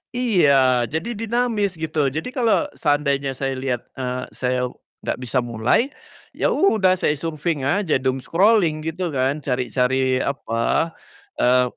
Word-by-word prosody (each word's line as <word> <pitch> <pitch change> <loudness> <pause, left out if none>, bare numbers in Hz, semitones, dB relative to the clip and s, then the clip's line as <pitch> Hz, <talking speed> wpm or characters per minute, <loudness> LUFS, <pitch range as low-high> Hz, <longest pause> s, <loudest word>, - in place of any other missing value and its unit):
Iya, 140 - +3
jadi 165 +10 -3
dinamis 225 -4 -1
gitu 155 -3 0
jadi 155 +4 -4
kalo 245 +3 +2 0.2
seandainya 140 -3 +1
saya 135 -1 -1
liat, 130 -2 -2
eee, 125 -1 -3
saya 125 0 -1 0.4
gak - - -1
bisa 125 +2 -2
mulai, 120 - +1 0.4
ya - - +1
udah 190 - +3
saya 150 - +1
surfing 155 0 -3
aja 160 +5 0
doom 130 0 +1
scrolling 170 - +2
gitu 170 -1 -4
kan 130 +1 +1
cari-cari 130 0 +1
apa, 130 -4 -3 0.8
eee, 125 0 +3
140 Hz, 135 wpm, -22 LUFS, 130-185 Hz, 0.8 s, Iya